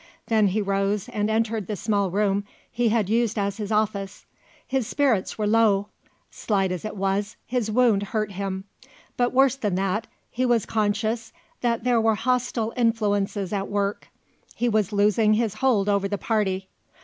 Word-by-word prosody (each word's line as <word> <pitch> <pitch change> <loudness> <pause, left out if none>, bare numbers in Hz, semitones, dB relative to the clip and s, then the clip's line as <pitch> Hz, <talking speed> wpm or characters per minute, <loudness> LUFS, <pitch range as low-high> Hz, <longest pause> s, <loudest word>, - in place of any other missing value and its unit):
Then 220 -2 +4
he 205 +3 0
rose 195 +2 0
and 210 -3 -1
entered 220 -2 0
the 210 - -2
small 200 0 0
room 200 +1 +1 0.3
he 240 -1 +1
had 215 -3 +1
used 225 +1 +1
as 200 0 -1
his 210 -1 -4
office. 205 -2 -1 0.4
His 260 -4 -1
spirits 260 -10 +1
were 215 - -1
low. 210 -2 +3 0.4
Slight 195 -3 0
as 180 - -4
it 215 - -5
was, 195 +2 -1
his 245 -3 -1
wound 225 -3 +3
hurt 215 0 -2
him; 190 0 -4 0.5
but 245 0 +1
worse 265 0 +4
than 210 -8 -2
that, 195 +3 -1 0.2
he 255 - -1
was 240 -4 +2
conscious 220 +1 -1 0.3
that 235 -2 0
there 240 -2 +3
were 220 -1 +3
hostile 240 -1 -1
influences 205 -4 0
at 195 -1 -1
work; 200 0 -2 0.5
he 245 - 0
was 215 -3 +1
losing 210 +1 +3
his 220 -2 0
hold 215 -3 +1
over 200 -1 +2
the 205 +1 -2
Party. 195 -3 -1
215 Hz, 170 wpm, -24 LUFS, 200-230 Hz, 0.5 s, Then